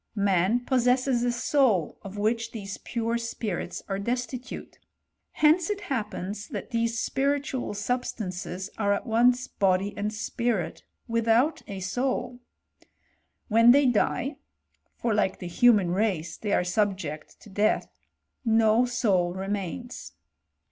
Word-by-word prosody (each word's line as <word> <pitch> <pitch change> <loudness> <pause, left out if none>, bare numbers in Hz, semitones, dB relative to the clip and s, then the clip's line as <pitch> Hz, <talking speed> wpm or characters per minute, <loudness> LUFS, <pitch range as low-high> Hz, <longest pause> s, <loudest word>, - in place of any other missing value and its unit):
Man 200 +3 +2
possesses 250 -1 +2
a - - +1
sottf^ 240 - +2
of 195 +1 -9
which 230 +2 0
these 200 -3 -6
pure 235 -1 -2
spirits 220 -6 -4
are 195 -1 -2
destitute. 250 +3 -4 0.5
Hence 315 +4 +4
it 410 -1 -2
happens 210 -3 -4
that - - -6
these 230 -1 0
spiritual 275 -4 -1
substances 205 -4 -3
are 200 -1 +2
at 200 - -3
once 245 +2 +3
body 195 +1 +1
and 210 +1 -2
spirit 215 -4 -2 0.3
without 230 +5 +2
a 195 -2 -6
soul. 245 +5 -2 1.1
When 230 +1 +5
they 280 +3 +7
die 265 +4 +1 0.6
(for 235 -2 -1
like 205 -2 +1
the - - -8
human 195 0 +4
race 180 -5 0
they 210 - -4
are - - +3
subject 180 -5 -2
to 210 - -14
death), 205 +2 +1 0.6
no, 225 0 +4
soul 185 -7 +1
remains. 200 +5 -5
225 Hz, 125 wpm, -27 LUFS, 195-245 Hz, 1.1 s, they